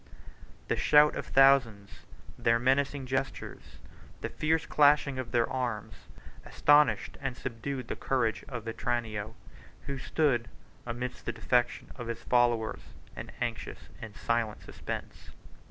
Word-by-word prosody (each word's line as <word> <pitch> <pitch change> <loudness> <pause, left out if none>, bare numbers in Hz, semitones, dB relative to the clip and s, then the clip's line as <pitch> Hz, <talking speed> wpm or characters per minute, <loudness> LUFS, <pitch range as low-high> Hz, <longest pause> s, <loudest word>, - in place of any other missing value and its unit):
The - - +1
shout 150 0 +5
of - - -5
thousands, 130 -7 +3 0.3
their 115 0 +2
menacing 135 +2 +1
gestures, 130 +1 -4 0.4
the - - -3
fierce 160 +1 0
clashing 145 -2 +3
of 120 -3 -5
their 115 -1 +2
arms, 120 -5 -3 0.5
astonished 145 0 +3
and 135 -3 -3
subdued 130 +1 -5
the - - -3
courage 125 -5 0
of 125 -5 -6
Vetranio, 115 -2 -3 0.5
who 140 -1 -4
stood, 130 -4 +1 0.4
amidst 125 +1 -5
the - - +1
defection 125 -1 0
of 120 -3 -6
his 115 0 -5
followers, 120 -3 +2 0.3
in - - -7
anxious - - -4
and 110 -2 -8
silent 115 -2 -1
suspense. - - -7
125 Hz, 125 wpm, -30 LUFS, 115-135 Hz, 0.5 s, shout